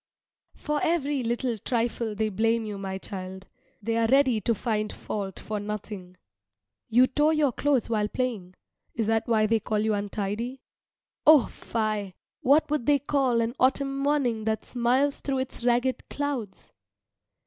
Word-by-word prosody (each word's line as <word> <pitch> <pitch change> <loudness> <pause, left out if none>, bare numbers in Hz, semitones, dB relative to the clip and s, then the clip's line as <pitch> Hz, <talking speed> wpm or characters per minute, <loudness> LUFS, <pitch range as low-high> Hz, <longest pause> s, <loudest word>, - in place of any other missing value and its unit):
For 300 -1 -2
every 295 -4 +1
little 235 -1 -1
trifle 230 -1 -1
they 215 +1 0
blame 225 +3 +1
you, 205 -2 -5
my 190 -1 -4
child. 190 0 -7 0.4
They 230 +2 0
are 230 0 +3
ready 260 -3 +4
to 230 +4 +1
find 215 0 -1
fault 195 -3 -5
for 215 -1 -4
nothing. 205 -3 -6 0.7
You 245 +3 +6
tore 295 +4 +2
your 300 -4 +3
clothes 275 0 +1
while 215 -2 0
playing 210 -8 -3 0.4
is 225 - 0
that 225 +2 +1
why 220 -2 +3
they 225 +1 +2
call 215 0 -2
you 215 +1 +1
untidy? 210 +5 -3 0.6
O, 305 -5 +8
fie! 215 -4 -3 0.3
What 285 +5 +4
would 300 -6 -1
they 290 -1 +5
call 270 -4 +1
an 230 +1 -1
autumn 275 +1 +2
morning 275 -6 0
that 220 -1 -1
smiles 255 +4 +1
through 275 -1 -2
its 260 -2 -4
ragged 245 +1 +1
clouds? 280 -8 -4
230 Hz, 155 wpm, -27 LUFS, 210-265 Hz, 0.7 s, O